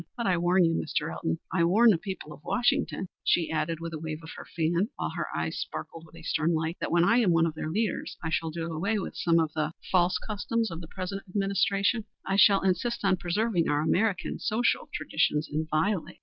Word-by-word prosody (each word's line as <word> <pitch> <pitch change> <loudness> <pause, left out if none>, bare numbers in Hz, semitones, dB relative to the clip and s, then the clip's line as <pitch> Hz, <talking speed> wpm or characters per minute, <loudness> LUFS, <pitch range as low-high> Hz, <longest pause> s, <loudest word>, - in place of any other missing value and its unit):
But 235 - -2
I 185 - +3
warn 175 +1 +3
you, 165 - +2
Mr. - - -2
Elton, 80 0 -2 0.2
I 180 - +3
warn 220 +7 +6
the 185 - +2
people 190 -6 -6
of 150 - -15
Washington," 245 -5 0 0.2
she 165 -2 +2
added 160 +1 -1
with 165 0 -6
a 155 - -4
wave 160 0 -5
of 160 - -9
her - - -10
fan, 170 +5 +1
while - - -3
her - - -3
eyes - - -2
sparkled 165 0 -6
with 160 - -18
a 165 - -12
stern 160 +1 +1
light 160 +2 -2
"that - - -3
when 170 0 +4
I 230 +7 +4
am 230 -6 +3
one 165 0 +4
of 165 - -1
their 155 0 -4
leaders, 210 +3 -2
I 165 - -2
shall 165 0 0
do 165 +1 -4
away 200 +8 0
with 195 - -4
some 170 -1 +3
of 160 -2 0
the 155 - -1
er 155 - -5 0.2
false 180 -1 +3
customs 225 +1 -2
of 165 +1 -6
the 165 - -9
present 190 +3 -5
administration. 200 +3 +1 0.2
I 195 - 0
shall 200 -1 +6
insist 195 +5 0
on 190 -1 +3
preserving 180 0 0
our 145 0 +2
American 195 +4 0
social 230 +3 0
traditions 150 +1 0
inviolate." 160 +5 -1
175 Hz, 225 wpm, -28 LUFS, 160-200 Hz, 0.2 s, warn